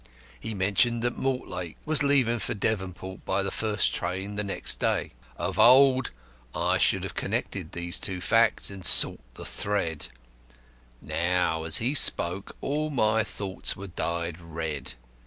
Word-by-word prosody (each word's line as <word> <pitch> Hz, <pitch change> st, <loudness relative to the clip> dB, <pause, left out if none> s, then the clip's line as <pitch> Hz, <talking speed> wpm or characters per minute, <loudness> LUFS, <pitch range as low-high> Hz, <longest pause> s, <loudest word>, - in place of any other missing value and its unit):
He 110 Hz, -1 st, -5 dB
mentioned 105 Hz, +5 st, +1 dB
that 120 Hz, 0 st, -1 dB
Mortlake 90 Hz, -10 st, -4 dB
was 155 Hz, -2 st, +3 dB
leaving 130 Hz, -5 st, +2 dB
for 95 Hz, -, -3 dB
Devonport 95 Hz, -3 st, -4 dB
by 95 Hz, +1 st, -1 dB
the 95 Hz, -, -3 dB
first 105 Hz, -2 st, 0 dB
train 95 Hz, +2 st, -3 dB
on -, -, -8 dB
the 105 Hz, -, -1 dB
next 100 Hz, -, 0 dB
day. -, -, 0 dB, 0.3 s
Of -, -, -4 dB
old 130 Hz, +1 st, +6 dB, 0.5 s
I -, -, +1 dB
should -, -, +2 dB
have -, -, -5 dB
connected -, -, -4 dB
these 85 Hz, +1 st, -1 dB
two 95 Hz, -2 st, -1 dB
facts 115 Hz, +3 st, +1 dB
and 95 Hz, -2 st, -8 dB
sought -, -, +7 dB
the -, -, -8 dB
thread; 85 Hz, -7 st, -2 dB, 1.0 s
now, 85 Hz, -1 st, -1 dB
as 80 Hz, -, +3 dB
he 125 Hz, +5 st, 0 dB
spoke, 90 Hz, -8 st, +4 dB
all 150 Hz, +2 st, -2 dB
my 110 Hz, -5 st, +1 dB
thoughts 95 Hz, -2 st, -2 dB
were 100 Hz, -, -9 dB
dyed 85 Hz, -1 st, -3 dB
red. 80 Hz, -4 st, -5 dB
100 Hz, 155 wpm, -26 LUFS, 90-115 Hz, 1.0 s, sought